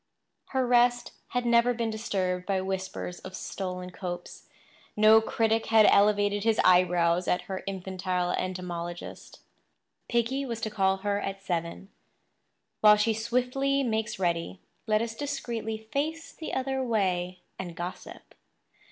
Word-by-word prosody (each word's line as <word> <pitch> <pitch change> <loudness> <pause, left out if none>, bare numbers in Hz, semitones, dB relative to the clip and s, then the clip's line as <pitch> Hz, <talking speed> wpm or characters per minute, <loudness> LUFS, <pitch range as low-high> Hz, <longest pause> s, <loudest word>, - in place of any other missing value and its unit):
Her 265 -1 0
rest 240 0 +3 0.2
had 245 -1 -2
never 235 +1 +4
been 230 -1 -1
disturbed 185 -4 -2
by 195 -2 +1
whispers 190 -1 -4
of 185 0 -9
stolen 180 -2 -5
copes; 175 -1 -7 0.5
no 215 +1 +7
critic 225 0 0
had 220 -1 +6
elevated 205 0 +4
his 225 -1 +2
eyebrows 180 -1 +4
at 180 0 +1
her 190 +1 -5
infantile 185 -2 -2
entomologist. 175 -2 -5 0.7
Piggy 240 +4 0
was 235 -4 -4
to 215 - -2
call 195 -2 +2
for 190 - -19
her 205 0 0
at 195 0 -5
seven. 170 +1 -3 0.9
While 210 0 +7
she 220 +2 +2
swiftly 250 +5 0
makes 220 -3 -1
ready, 170 - -1 0.3
let 215 +1 +2
us 230 -1 -4
discreetly 235 -4 -4 0.2
face 315 +4 -2
the 315 - -7
other 265 0 -1
way 185 -6 -1 0.2
and 175 -3 -6
gossip. 175 +1 -8
205 Hz, 135 wpm, -28 LUFS, 180-235 Hz, 0.9 s, no